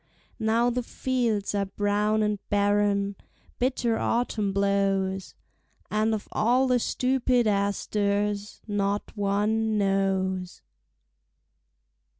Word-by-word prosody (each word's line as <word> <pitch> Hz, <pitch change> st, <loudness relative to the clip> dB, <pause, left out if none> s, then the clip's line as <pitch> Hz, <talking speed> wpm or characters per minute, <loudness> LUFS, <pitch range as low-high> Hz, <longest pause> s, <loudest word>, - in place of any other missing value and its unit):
Now 230 Hz, +2 st, +2 dB
the 250 Hz, +1 st, -1 dB
fields 235 Hz, -5 st, -1 dB
are 200 Hz, -1 st, 0 dB
brown 210 Hz, +2 st, +1 dB
and 210 Hz, -1 st, 0 dB
barren, 205 Hz, -1 st, +1 dB, 0.4 s
Bitter 245 Hz, -2 st, 0 dB
autumn 225 Hz, -4 st, 0 dB
blows, 195 Hz, -1 st, 0 dB, 0.6 s
And 215 Hz, +1 st, +2 dB
of 210 Hz, -, -7 dB
all 245 Hz, +5 st, +2 dB
the 250 Hz, -1 st, +2 dB
stupid 250 Hz, 0 st, +1 dB
asters 205 Hz, 0 st, -1 dB
Not 205 Hz, 0 st, -1 dB
one 210 Hz, +2 st, +1 dB
knows. 190 Hz, -2 st, 0 dB
205 Hz, 95 wpm, -26 LUFS, 200-225 Hz, 0.6 s, Now